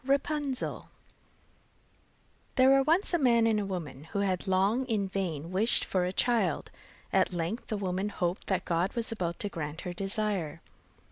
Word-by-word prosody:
RAPUNZEL 280 0 -1 1.7
There 260 0 +6
were 270 0 +6
once 330 +8 +2
a 345 - +3
man 235 -4 +4
and 220 -2 +3
a 205 - -1
woman 150 -7 -5
who 200 +5 -2
had 190 0 -1
long 195 +7 +2
in 210 -5 0
vain 175 -5 -3
wished 210 +6 +3
for 185 -2 0
a 180 - -1
child. 210 -5 +1 0.4
At - - +3
length 175 +7 -3
the 215 - -2
woman 190 +1 -1
hoped 180 -2 -2
that 190 - 0
God 175 +2 0
was 235 -1 -2
about 175 -6 -2
to 205 - -1
grant 160 -2 -5
her 180 - -5
desire. 195 -4 -1
195 Hz, 165 wpm, -30 LUFS, 180-235 Hz, 1.7 s, There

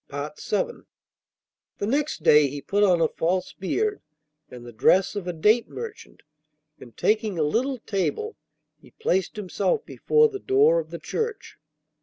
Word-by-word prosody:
VIII 475 -1 -4 0.9
The - - -2
next 290 +7 -1
day 150 -1 +6
he 145 +2 -6
put 200 +8 -1
on 180 -4 +4
a 160 - +4
false 180 +4 -1
beard 415 - -2 0.5
and 125 -1 -11
the 120 - -10
dress 185 - +3
of 195 -3 -4
a - - 0
date 210 +8 +2
merchant, 455 -2 -9 0.6
and, 120 -3 -14
taking 215 -3 +1
a 155 - +2
little 250 - 0
table, 400 - -2 0.4
he - - -19
placed 190 - -1
himself 215 - -1
before 455 0 +3
the 405 -3 -7
door 430 +6 +4
of - - -6
the - - -6
church. 455 -2 -5
215 Hz, 155 wpm, -25 LUFS, -, 0.9 s, day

